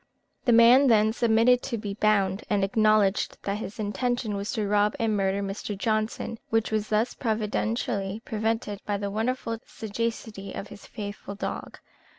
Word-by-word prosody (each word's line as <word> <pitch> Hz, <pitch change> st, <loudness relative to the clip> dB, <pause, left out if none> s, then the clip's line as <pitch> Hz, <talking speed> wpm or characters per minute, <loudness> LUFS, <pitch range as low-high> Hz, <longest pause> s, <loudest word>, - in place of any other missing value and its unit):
The 245 Hz, -, +4 dB
man 235 Hz, +4 st, +7 dB
then 220 Hz, -2 st, +4 dB
submitted 235 Hz, +2 st, +4 dB
to 240 Hz, -3 st, -3 dB
be 205 Hz, -2 st, -4 dB
bound, 200 Hz, -2 st, +1 dB
and 205 Hz, -2 st, +2 dB
acknowledged 215 Hz, -1 st, +2 dB
that 200 Hz, +1 st, -2 dB
his 210 Hz, -, -7 dB
intention 220 Hz, +2 st, -1 dB
was 200 Hz, +1 st, -3 dB
to 215 Hz, -2 st, -1 dB
rob 210 Hz, +1 st, +2 dB
and 225 Hz, -2 st, +1 dB
murder 195 Hz, 0 st, 0 dB
Mr. 195 Hz, +1 st, -4 dB
Johnson, 215 Hz, +2 st, -1 dB
which 225 Hz, -1 st, +1 dB
was 215 Hz, -1 st, -1 dB
thus 220 Hz, +3 st, +1 dB
providentially 215 Hz, -2 st, -2 dB
prevented 220 Hz, -2 st, -2 dB
by 205 Hz, -1 st, -1 dB
the 200 Hz, 0 st, -3 dB
wonderful 230 Hz, +1 st, -2 dB
sagacity 220 Hz, -2 st, -4 dB
of 200 Hz, -, -6 dB
his 205 Hz, -, -12 dB
faithful 205 Hz, -2 st, -7 dB
dog. -, -, -5 dB
215 Hz, 160 wpm, -26 LUFS, 200-225 Hz, -, man